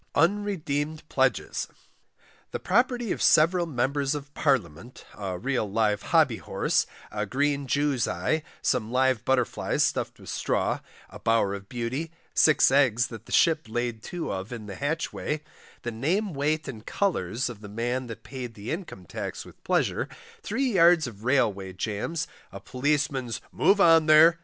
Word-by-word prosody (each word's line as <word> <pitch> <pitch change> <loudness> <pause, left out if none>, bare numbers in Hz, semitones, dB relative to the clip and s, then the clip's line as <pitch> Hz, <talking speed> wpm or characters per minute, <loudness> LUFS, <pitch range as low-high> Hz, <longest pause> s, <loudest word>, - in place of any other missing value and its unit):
UNREDEEMED 160 -6 0
PLEDGES, 130 -1 0 0.8
The - - -4
Property 240 +2 +1
of - - -2
several 170 +2 +4
Members 140 +1 0
of 145 0 -7
Parliament, 120 - -1
a 95 -3 -4
real 125 +1 -1
Live 105 -1 +1
Hobby - - +3
Horse, - - 0 0.2
a 105 -1 -2
Green 140 +3 0
Jew's 140 -1 +1
Eye, 155 0 0 0.2
some 110 +1 0
Live 130 -2 +2
Butterflies 130 -1 +1
stuffed - - -1
with - - -11
Straw, - - 0 0.3
the - - -9
Bower 115 -3 +2
of 100 0 -8
Beauty, 125 +7 -3 0.2
Six 155 -4 +5
Eggs 125 -4 +3
that 115 -2 -10
the - - -11
Ship 160 -2 +4
laid 120 0 -2
too 175 - -4
of 95 +3 -5
in 115 -3 -6
the 100 - -7
Hatchway, 150 - -2 0.4
the 120 - -3
name 170 - 0
weight 150 +2 0
and 110 -5 -7
colours 120 - -1
of 115 -4 -8
the 105 - -9
Man 120 +4 -2
that 115 - -8
paid 125 -4 -7
the 105 +2 -6
Income 160 - -6
Tax - - -5
with - - -16
pleasure, - - 0 0.3
three 255 +4 -1
yards 170 -3 +6
of 110 -4 -9
Railway 100 -8 +1
Jams, 110 - -3 0.2
a 100 - -8
Policeman's 135 0 -1
"Move 200 +2 +4
on 165 -4 +6
there!" 160 +2 +7
135 Hz, 155 wpm, -27 LUFS, 115-155 Hz, 0.8 s, there